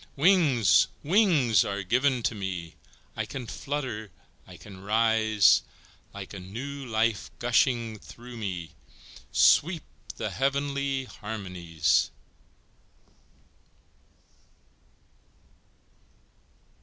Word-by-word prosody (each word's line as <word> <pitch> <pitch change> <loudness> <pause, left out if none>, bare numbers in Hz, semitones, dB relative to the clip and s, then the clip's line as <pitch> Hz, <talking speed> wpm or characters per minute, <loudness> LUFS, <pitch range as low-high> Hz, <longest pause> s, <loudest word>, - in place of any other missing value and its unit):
Wings! 135 - +4 0.2
wings 150 - +4
are 100 -1 -3
given 125 +4 +1
to - - 0
me, 95 -5 -5 0.4
I - - -2
can 130 -3 -6
flutter, 125 -4 -4 0.4
I - - -12
can 95 -2 -12
rise, 110 -1 +4 0.5
Like 100 -1 -9
a 100 - -7
new 130 +9 -7
life 110 -1 0
gushing 120 -2 +1
through 120 +3 -12
me 90 -7 -5 0.6
Sweep 165 0 +4 0.3
the - - -3
heavenly 140 0 -1
harmonies! 90 - -1
115 Hz, 80 wpm, -27 LUFS, 100-135 Hz, 0.6 s, Wings